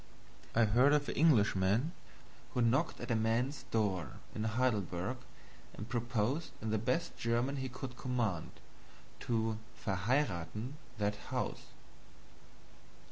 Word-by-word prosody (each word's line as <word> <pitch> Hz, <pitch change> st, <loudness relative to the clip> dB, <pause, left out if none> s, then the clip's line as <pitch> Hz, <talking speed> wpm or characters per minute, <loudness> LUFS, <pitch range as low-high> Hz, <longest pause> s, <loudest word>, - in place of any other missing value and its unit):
I 115 Hz, 0 st, +6 dB
heard 125 Hz, +7 st, +5 dB
of 145 Hz, -1 st, +3 dB
an -, -, -2 dB
Englishman 115 Hz, -, +4 dB, 0.6 s
who 125 Hz, -, +3 dB
knocked 130 Hz, +8 st, +2 dB
at 120 Hz, +1 st, -4 dB
a -, -, +3 dB
man's 115 Hz, +6 st, +1 dB
door 100 Hz, -6 st, 0 dB, 0.2 s
in 110 Hz, -, -2 dB
Heidelberg 110 Hz, -2 st, 0 dB, 0.6 s
and 105 Hz, -, -6 dB
proposed, 120 Hz, +5 st, 0 dB
in 110 Hz, 0 st, -2 dB
the 110 Hz, -, +2 dB
best 125 Hz, +10 st, 0 dB
German 120 Hz, +4 st, +1 dB
he 130 Hz, -1 st, -2 dB
could 130 Hz, 0 st, -6 dB
command, 120 Hz, -9 st, -1 dB, 0.7 s
to 110 Hz, -2 st, 0 dB, 0.3 s
"verheirathen" 105 Hz, -, 0 dB, 0.3 s
that 105 Hz, 0 st, 0 dB
house. -, -, -2 dB
115 Hz, 120 wpm, -34 LUFS, 105-130 Hz, 0.7 s, I